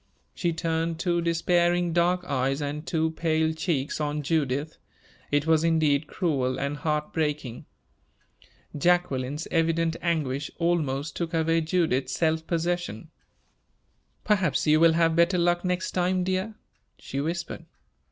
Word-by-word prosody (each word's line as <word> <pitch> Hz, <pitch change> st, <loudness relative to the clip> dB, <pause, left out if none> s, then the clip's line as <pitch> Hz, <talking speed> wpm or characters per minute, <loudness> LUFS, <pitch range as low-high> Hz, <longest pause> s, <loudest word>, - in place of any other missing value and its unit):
She 175 Hz, -, -1 dB
turned 165 Hz, 0 st, -1 dB
two 175 Hz, 0 st, 0 dB
despairing 175 Hz, +1 st, +1 dB
dark 175 Hz, +1 st, +2 dB
eyes 135 Hz, -2 st, 0 dB
and 150 Hz, +2 st, -4 dB
two 160 Hz, -1 st, 0 dB
pale 160 Hz, -1 st, 0 dB
cheeks 155 Hz, -3 st, -2 dB
on 150 Hz, 0 st, -2 dB
Judith. 145 Hz, 0 st, -1 dB, 0.5 s
It 145 Hz, 0 st, +1 dB
was 160 Hz, -1 st, +3 dB
indeed 155 Hz, -3 st, +2 dB
cruel 135 Hz, -8 st, -1 dB
and 140 Hz, +1 st, -2 dB
heart 150 Hz, +1 st, -2 dB
breaking. 150 Hz, -6 st, -2 dB, 1.1 s
Jacqueline's 150 Hz, -3 st, 0 dB
evident 165 Hz, 0 st, +1 dB
anguish 150 Hz, -5 st, -1 dB
almost 155 Hz, -4 st, -1 dB
took 170 Hz, -1 st, -3 dB
away 165 Hz, 0 st, +2 dB
Judith's 155 Hz, -6 st, 0 dB
self 160 Hz, -1 st, 0 dB
possession. 170 Hz, -, -2 dB, 1.1 s
"Perhaps 190 Hz, -7 st, +1 dB
you 155 Hz, 0 st, +4 dB
will 165 Hz, 0 st, +6 dB
have 165 Hz, 0 st, +2 dB
better 170 Hz, +2 st, +3 dB
luck 175 Hz, 0 st, +2 dB
next 180 Hz, 0 st, -1 dB
time, 180 Hz, 0 st, +1 dB
dear," 190 Hz, +4 st, -2 dB, 0.4 s
she 140 Hz, -, -4 dB
whispered. 170 Hz, +3 st, -4 dB
160 Hz, 130 wpm, -26 LUFS, 150-175 Hz, 1.1 s, will